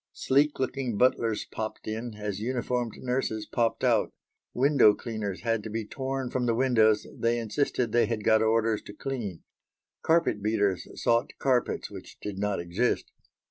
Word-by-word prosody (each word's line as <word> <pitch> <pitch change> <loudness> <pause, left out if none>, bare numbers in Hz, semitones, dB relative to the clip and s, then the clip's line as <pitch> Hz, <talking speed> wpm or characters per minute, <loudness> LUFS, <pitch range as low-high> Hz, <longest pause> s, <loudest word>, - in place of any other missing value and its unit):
Sleek 145 +3 +2
looking 130 -3 -2
butlers 115 -2 +2
popped 110 -1 -6
in, 110 +1 -4
as 105 -2 -4
uniformed 120 0 -1
nurses 125 -4 -2
popped 115 0 0
out. - - +3 0.4
Window 130 -5 +5
cleaners 110 -5 -4
had 115 -2 0
to 110 - -7
be 110 0 -3
torn 135 +1 -3
from 125 -1 0
the 115 - +2
windows 110 -4 +3
they 115 +1 +1
insisted 120 0 -1
they 120 +1 +3
had 115 -2 -2
got 110 +1 +4
orders 110 -1 +2
to 100 - -9
clean; 105 -7 -5 0.6
carpet 165 -10 +2
beaters 100 -3 0
sought 115 0 +1
carpets 130 -3 0
which - - -10
did 100 -2 -5
not 105 -2 0
exist. 85 +8 -1
115 Hz, 155 wpm, -28 LUFS, 105-125 Hz, 0.6 s, Window